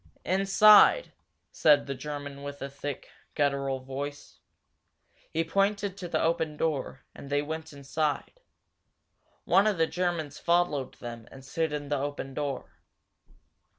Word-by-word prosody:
"Inside!" 200 Hz, -, +6 dB, 0.4 s
said 150 Hz, -2 st, +4 dB
the 140 Hz, -, -3 dB
German 145 Hz, +1 st, -6 dB
with 145 Hz, 0 st, -6 dB
the 140 Hz, 0 st, -6 dB
thick, 140 Hz, 0 st, -6 dB, 0.3 s
guttural 140 Hz, -2 st, 0 dB
voice. 140 Hz, +2 st, -7 dB, 0.9 s
He 165 Hz, -, +1 dB
pointed 200 Hz, +3 st, 0 dB
to 185 Hz, -2 st, -6 dB
the -, -, 0 dB
open 160 Hz, -2 st, 0 dB
door, 145 Hz, -4 st, -2 dB
and 140 Hz, -, -11 dB
they 145 Hz, 0 st, +1 dB
went 160 Hz, +1 st, -5 dB
inside. 145 Hz, -, -3 dB, 1.1 s
One 195 Hz, +3 st, +4 dB
of 210 Hz, -4 st, +1 dB
the 165 Hz, -, +4 dB
Germans 165 Hz, -4 st, -2 dB
followed 170 Hz, -6 st, +1 dB
them 120 Hz, -2 st, -8 dB
and 135 Hz, 0 st, -13 dB
stood 160 Hz, +3 st, -1 dB
in 145 Hz, -1 st, -4 dB
the 145 Hz, -1 st, 0 dB
open 140 Hz, -1 st, -4 dB
door. 140 Hz, -1 st, -4 dB
145 Hz, 135 wpm, -28 LUFS, 140-170 Hz, 1.1 s, Inside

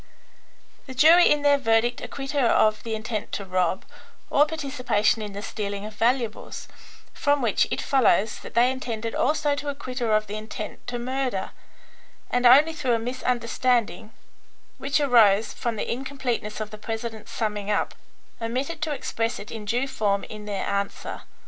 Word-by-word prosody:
The 260 Hz, -, -8 dB
jury 325 Hz, +6 st, +7 dB
in 295 Hz, -1 st, +2 dB
their 285 Hz, -1 st, +4 dB
verdict 235 Hz, -1 st, +2 dB
acquit 270 Hz, -1 st, -6 dB
her 280 Hz, -5 st, +2 dB
of 215 Hz, -1 st, +3 dB
the 225 Hz, -1 st, -3 dB
intent 220 Hz, 0 st, -4 dB
to 200 Hz, -, -3 dB
rob, 185 Hz, 0 st, 0 dB, 0.5 s
or 295 Hz, +1 st, +5 dB
participation 260 Hz, -8 st, 0 dB
in 210 Hz, -1 st, -6 dB
the 200 Hz, +1 st, -6 dB
stealing 205 Hz, -2 st, -4 dB
of 215 Hz, -, -7 dB
valuables, 230 Hz, +1 st, -1 dB, 0.5 s
from 285 Hz, 0 st, +1 dB
which 230 Hz, -6 st, +2 dB
it -, -, -2 dB
follows 225 Hz, -6 st, +2 dB
that -, -, -11 dB
they 245 Hz, +2 st, +5 dB
intended 230 Hz, -4 st, -4 dB
also 300 Hz, -1 st, +1 dB
to 285 Hz, 0 st, -3 dB
acquit 275 Hz, -2 st, -5 dB
her 225 Hz, -3 st, +2 dB
of 215 Hz, 0 st, +1 dB
the 210 Hz, +1 st, -5 dB
intent 215 Hz, 0 st, -7 dB
to 245 Hz, 0 st, -3 dB
murder, 255 Hz, -4 st, -2 dB, 0.8 s
and 245 Hz, 0 st, +4 dB
only 290 Hz, +6 st, +7 dB
through 265 Hz, -6 st, 0 dB
a -, -, +1 dB
misunderstanding, 240 Hz, -1 st, -1 dB, 0.7 s
which 275 Hz, +2 st, +1 dB
arose 225 Hz, -7 st, +4 dB
from 235 Hz, -2 st, -3 dB
the 210 Hz, -, -3 dB
incompleteness 250 Hz, -4 st, -3 dB
of 215 Hz, -1 st, -5 dB
the 215 Hz, -, -9 dB
president's 225 Hz, 0 st, -5 dB
summing 210 Hz, -2 st, -2 dB
up, 210 Hz, -, 0 dB, 0.5 s
omitted 260 Hz, +8 st, -3 dB
to 310 Hz, 0 st, -1 dB
express 230 Hz, -4 st, -2 dB
it 205 Hz, -, -9 dB
in 220 Hz, -2 st, -6 dB
due 245 Hz, +6 st, 0 dB
form 205 Hz, -6 st, 0 dB
in 210 Hz, -1 st, -9 dB
their 200 Hz, -2 st, -3 dB
answer. 200 Hz, 0 st, -3 dB
235 Hz, 170 wpm, -25 LUFS, 215-265 Hz, 0.8 s, jury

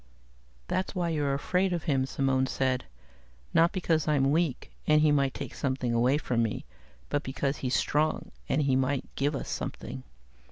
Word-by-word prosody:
"That's 190 Hz, +2 st, -1 dB
why 175 Hz, -2 st, 0 dB
you're 145 Hz, -4 st, 0 dB
afraid 180 Hz, +6 st, +1 dB
of 170 Hz, -, -2 dB
him," 135 Hz, -5 st, +1 dB
Simone 135 Hz, -1 st, +1 dB
said. 130 Hz, -1 st, 0 dB, 0.7 s
"Not 170 Hz, +2 st, +5 dB
because 165 Hz, -6 st, 0 dB
I'm 140 Hz, -2 st, +3 dB
weak, 160 Hz, -4 st, 0 dB, 0.2 s
and 150 Hz, 0 st, +5 dB
he 155 Hz, -1 st, +5 dB
might 140 Hz, -2 st, +2 dB
take -, -, -5 dB
something 130 Hz, -3 st, -1 dB
away 125 Hz, +4 st, +3 dB
from 125 Hz, -5 st, 0 dB
me, 115 Hz, -2 st, -2 dB, 0.4 s
but 145 Hz, -, +1 dB
because 135 Hz, 0 st, -2 dB
he's 130 Hz, -1 st, -1 dB
strong, 155 Hz, +2 st, +1 dB, 0.2 s
and 150 Hz, -, +2 dB
he 135 Hz, -2 st, +2 dB
might 130 Hz, +1 st, 0 dB
give 145 Hz, +1 st, 0 dB
us -, -, -4 dB
something. 65 Hz, -, -5 dB
140 Hz, 170 wpm, -29 LUFS, 130-155 Hz, 0.7 s, Not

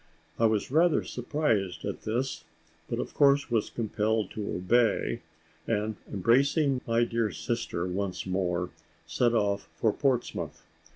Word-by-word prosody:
I 115 Hz, -, +5 dB
was 110 Hz, +2 st, 0 dB
rather 165 Hz, +2 st, +4 dB
surprised 115 Hz, -, -1 dB
at -, -, -4 dB
this, 125 Hz, +5 st, -2 dB, 0.5 s
but -, -, -1 dB
of -, -, -4 dB
course 140 Hz, -2 st, +4 dB
was 115 Hz, -3 st, +1 dB
compelled 110 Hz, -2 st, -1 dB
to 105 Hz, -2 st, -4 dB
obey 115 Hz, +6 st, +2 dB, 0.5 s
and, 110 Hz, -1 st, 0 dB, 0.2 s
embracing 135 Hz, -, +3 dB
my 115 Hz, 0 st, +3 dB
dear 115 Hz, -2 st, 0 dB
sister 95 Hz, -1 st, -3 dB
once 95 Hz, +1 st, -3 dB
more, 90 Hz, -2 st, -1 dB, 0.3 s
set 120 Hz, -1 st, +1 dB
off 100 Hz, -2 st, 0 dB
for 110 Hz, -2 st, +2 dB
Portsmouth. 130 Hz, -4 st, -1 dB
115 Hz, 130 wpm, -29 LUFS, 100-125 Hz, 0.5 s, I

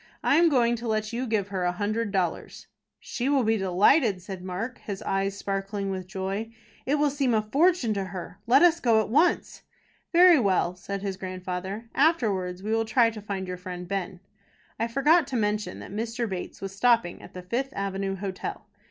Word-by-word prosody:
"I 285 Hz, -, +4 dB
am 335 Hz, 0 st, +5 dB
going 240 Hz, -4 st, +3 dB
to 235 Hz, +1 st, -6 dB
let 215 Hz, 0 st, -1 dB
you 250 Hz, +2 st, -2 dB
give 210 Hz, -3 st, 0 dB
her 190 Hz, -2 st, -2 dB
a 180 Hz, -, +2 dB
hundred 210 Hz, +3 st, -2 dB
dollars." 185 Hz, -4 st, -2 dB, 0.3 s
"She 255 Hz, +3 st, -3 dB
will 280 Hz, -3 st, +3 dB
be 225 Hz, 0 st, +2 dB
delighted," 200 Hz, -, +3 dB
said 185 Hz, 0 st, -8 dB
Mark, 195 Hz, +7 st, -5 dB
his 200 Hz, -2 st, -6 dB
eyes 195 Hz, 0 st, -1 dB
sparkling 195 Hz, 0 st, -3 dB
with 185 Hz, -1 st, -5 dB
joy. 195 Hz, +3 st, -4 dB, 0.4 s
"It 280 Hz, -, +3 dB
will 295 Hz, -1 st, +2 dB
seem 270 Hz, -4 st, +1 dB
a 215 Hz, -, +3 dB
fortune 280 Hz, +1 st, +2 dB
to 195 Hz, -2 st, -2 dB
her. 185 Hz, 0 st, -8 dB
Let 265 Hz, +7 st, +6 dB
us 345 Hz, -1 st, +5 dB
go 230 Hz, -6 st, +3 dB
at 220 Hz, -, -1 dB
once." 310 Hz, +9 st, +2 dB, 0.5 s
"Very 350 Hz, -2 st, +7 dB
well," 185 Hz, -5 st, +1 dB
said 195 Hz, +2 st, -6 dB
his 195 Hz, -2 st, -3 dB
grandfather. 185 Hz, +3 st, -5 dB
"Afterwards 200 Hz, -, +1 dB
we 215 Hz, -, -3 dB
will 225 Hz, 0 st, +2 dB
try 230 Hz, +1 st, +3 dB
to 215 Hz, -1 st, -8 dB
find 195 Hz, -2 st, -4 dB
your 180 Hz, 0 st, -4 dB
friend 180 Hz, 0 st, -7 dB
Ben." 190 Hz, -1 st, -4 dB, 0.6 s
I 230 Hz, -, +1 dB
forgot 285 Hz, +6 st, +3 dB
to 270 Hz, -, -4 dB
mention 210 Hz, -, -1 dB
that -, -, -10 dB
Mr. 230 Hz, +3 st, -3 dB
Bates 185 Hz, -3 st, -6 dB
was 195 Hz, 0 st, -6 dB
stopping 230 Hz, -4 st, +2 dB
at -, -, -14 dB
the 180 Hz, -, -7 dB
Fifth 240 Hz, +9 st, -2 dB
Avenue 195 Hz, 0 st, -2 dB
Hotel. 190 Hz, -1 st, -5 dB
210 Hz, 195 wpm, -26 LUFS, 190-240 Hz, 0.6 s, Very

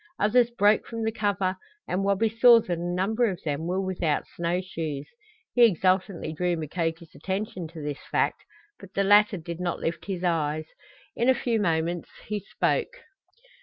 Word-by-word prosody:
Others 235 Hz, +3 st, +4 dB
broke 210 Hz, -2 st, +3 dB
from 230 Hz, -1 st, -4 dB
the 220 Hz, -, 0 dB
cover, 200 Hz, -4 st, -1 dB, 0.3 s
and 185 Hz, +2 st, -1 dB
Wabi 200 Hz, +3 st, +2 dB
saw 230 Hz, +2 st, +7 dB
that 180 Hz, -5 st, -2 dB
a 170 Hz, -, -6 dB
number 190 Hz, +7 st, +1 dB
of 185 Hz, -, -6 dB
them 150 Hz, +1 st, -2 dB
were 185 Hz, +2 st, 0 dB
without 180 Hz, -5 st, -1 dB
snow 170 Hz, +1 st, 0 dB
shoes. 160 Hz, -6 st, -5 dB, 0.5 s
He 245 Hz, -, +5 dB
exultantly 185 Hz, -4 st, +2 dB
drew 175 Hz, +2 st, 0 dB
Mukoki's 165 Hz, +1 st, -3 dB
attention 190 Hz, 0 st, -4 dB
to 160 Hz, -1 st, -9 dB
this 145 Hz, -1 st, -4 dB
fact, -, -, 0 dB, 0.4 s
but 195 Hz, -1 st, -14 dB
the 195 Hz, -, +2 dB
latter 205 Hz, +1 st, +5 dB
did 170 Hz, 0 st, -7 dB
not 180 Hz, -1 st, -2 dB
lift 165 Hz, -1 st, -3 dB
his 185 Hz, -3 st, -4 dB
eyes. 155 Hz, -3 st, 0 dB, 0.5 s
In 240 Hz, +2 st, +2 dB
a 260 Hz, -, +5 dB
few 235 Hz, -2 st, 0 dB
moments 170 Hz, -2 st, 0 dB, 0.2 s
he 210 Hz, 0 st, -2 dB
spoke. 475 Hz, -, -1 dB
185 Hz, 170 wpm, -26 LUFS, 165-210 Hz, 0.5 s, saw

